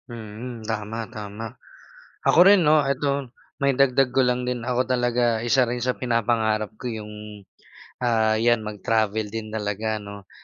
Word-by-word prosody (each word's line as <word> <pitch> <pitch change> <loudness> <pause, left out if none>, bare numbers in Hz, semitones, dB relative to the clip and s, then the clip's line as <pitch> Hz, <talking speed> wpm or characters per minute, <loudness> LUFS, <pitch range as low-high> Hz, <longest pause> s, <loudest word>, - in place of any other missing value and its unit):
Mm, 115 +1 -8
tama, 110 +1 -3
tama. 105 +1 -7 0.7
Ako - - +5
rin 195 -2 +6
'no, 150 -1 +5
'eto, 140 -1 -1 0.3
maidagdag 135 -1 +3
ko 130 - +1
lang 125 0 0
din, 125 -1 -3
ako 125 0 +1
talaga 120 -2 +1
isa 120 +3 +3
rin 120 0 -2
sa 125 +1 -1
pinapangarap 110 -3 0
ko 120 +2 -5
'yung, 105 -1 -7 0.9
ah 110 -2 +2
'yan 120 0 +3
mag-travel 110 0 -1
din 110 -1 -5
talaga 110 0 -2
'no. 100 -1 -10
115 Hz, 145 wpm, -24 LUFS, 110-125 Hz, 0.9 s, rin